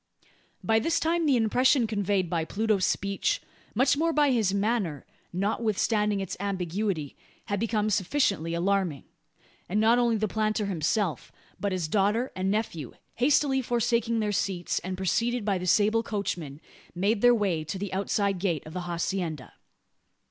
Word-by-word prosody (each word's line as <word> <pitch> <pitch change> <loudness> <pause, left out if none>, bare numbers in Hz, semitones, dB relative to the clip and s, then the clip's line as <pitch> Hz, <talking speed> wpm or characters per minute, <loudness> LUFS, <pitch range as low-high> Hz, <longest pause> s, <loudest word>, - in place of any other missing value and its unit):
By 225 0 +3
this 330 +8 +1
time 330 0 +1
the 275 - +4
impression 245 +3 +3
conveyed 205 -3 0
by 165 -1 -1
Pluto's 205 +2 0
speech 200 0 0 0.4
much 260 +6 +4
more 330 +3 +1
by 295 -3 +3
his 220 -6 +2
manner 200 - -1 0.3
notwithstanding 210 +1 0
its 195 -2 -4
ambiguity, 185 -4 -2 0.3
had 200 -1 -2
become 215 -1 0
sufficiently 190 - 0
alarming; 180 -4 0 0.7
and 205 +4 +1
not 225 +3 +4
only 235 -2 +2
the 215 0 0
planter 215 0 0
himself, 180 - -1 0.3
but 200 - -1
his 180 -4 -1
daughter 210 +8 +1
and 185 +1 -1
nephew, 195 - -2 0.2
hastily 270 +1 +3
forsaking 235 -2 0
their 210 -1 0
seats, 185 -3 -1
and 185 +1 -5
preceded 230 +5 0
by 195 -3 +1
the 180 - -4
sable 215 +4 +3
coachman, 175 -10 -4 0.3
made 200 +4 +1
their 245 0 +6
way 190 -8 0
to 160 +5 -5
the 195 0 -5
outside 200 0 0
gate 175 -6 -1
of 155 - -10
the 180 - -3
hacienda. 170 -3 -3
205 Hz, 155 wpm, -27 LUFS, 185-225 Hz, 0.7 s, their